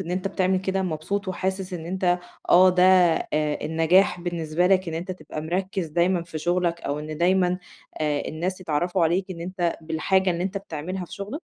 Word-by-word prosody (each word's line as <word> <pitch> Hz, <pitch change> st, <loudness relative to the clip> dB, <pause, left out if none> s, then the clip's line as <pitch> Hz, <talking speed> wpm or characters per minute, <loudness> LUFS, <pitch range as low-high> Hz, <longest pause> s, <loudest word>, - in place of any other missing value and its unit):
إن 175 Hz, -2 st, -5 dB
أنت 185 Hz, +2 st, -1 dB
بتعمل 190 Hz, -1 st, +1 dB
كده؟ 190 Hz, 0 st, -1 dB
مبسوط 185 Hz, +4 st, -3 dB
وحاسس 190 Hz, +1 st, -3 dB
إن 165 Hz, -2 st, -5 dB
أنت 180 Hz, 0 st, +1 dB, 0.3 s
آه، 185 Hz, +1 st, +8 dB
ده 180 Hz, 0 st, +2 dB, 0.5 s
النجاح 160 Hz, +5 st, +2 dB
بالنسبة 170 Hz, -1 st, -1 dB
لك 185 Hz, -1 st, +3 dB
إن 160 Hz, -, -4 dB
أنت 175 Hz, +3 st, -4 dB
تبقى 155 Hz, -3 st, -7 dB
مركِّز 185 Hz, +2 st, -2 dB
دايمًا 175 Hz, +3 st, +1 dB
في 170 Hz, -2 st, -7 dB
شغلك، 175 Hz, +1 st, 0 dB
أو 145 Hz, +1 st, -3 dB
إن 155 Hz, +1 st, -6 dB
دايمًا 180 Hz, 0 st, +2 dB, 0.4 s
آآ، 150 Hz, -2 st, 0 dB
الناس 180 Hz, +4 st, -3 dB
يتعرَّفوا 175 Hz, +2 st, 0 dB
عليك 185 Hz, +4 st, 0 dB
إن 170 Hz, -2 st, -6 dB
أنت 175 Hz, -1 st, -2 dB
بالحاجة 175 Hz, +4 st, +1 dB
اللي 170 Hz, 0 st, -1 dB
أنت 195 Hz, +2 st, -2 dB
بتعملها 185 Hz, 0 st, -5 dB
في -, -, -15 dB
شغلك؟ 210 Hz, -, -6 dB
180 Hz, 180 wpm, -24 LUFS, 160-185 Hz, 0.5 s, آه